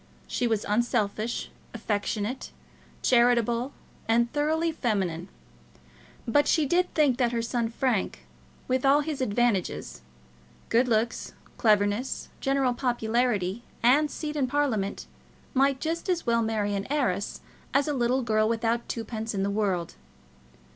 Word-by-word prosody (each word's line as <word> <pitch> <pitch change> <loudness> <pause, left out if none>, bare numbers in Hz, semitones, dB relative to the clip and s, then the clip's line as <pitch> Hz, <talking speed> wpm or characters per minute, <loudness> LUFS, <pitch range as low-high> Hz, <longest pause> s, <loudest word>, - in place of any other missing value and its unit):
She 245 - -1
was 220 -2 0
unselfish, 220 0 0 0.2
affectionate, 215 +2 -2 0.5
charitable, 240 +1 +3 0.4
and 235 +1 +2
thoroughly 315 +3 +1
feminine. 190 - -1 1.0
But 290 +5 +3
she 315 - +3
did 350 +5 +1
think 280 -5 +3
that 240 -2 +2
her 230 -1 0
son 235 0 -1
Frank, 235 -3 -1 0.4
with 255 0 0
all 280 +2 +5
his 295 -2 -4
advantages, 230 -4 0 0.7
good 240 +3 +3
looks, 230 0 0 0.3
cleverness, 210 +2 +1
general 270 -2 +1
popularity, 240 -4 0 0.2
and 285 +5 +5
seat 300 +1 -5
in 275 -3 +1
Parliament, 250 -8 -1 0.5
might 275 0 +3
just 335 +3 -3
as 355 -2 0
well 235 -1 +2
marry 215 -2 0
an 200 0 -2
heiress 205 -10 -1 0.3
as 280 +1 +2
a 295 - 0
little 255 0 +1
girl 215 -1 +2
without 230 +1 0
twopence 225 -1 -4
in 195 - 0
the 200 - 0
world. 195 -5 -1
235 Hz, 130 wpm, -27 LUFS, 215-270 Hz, 1.0 s, all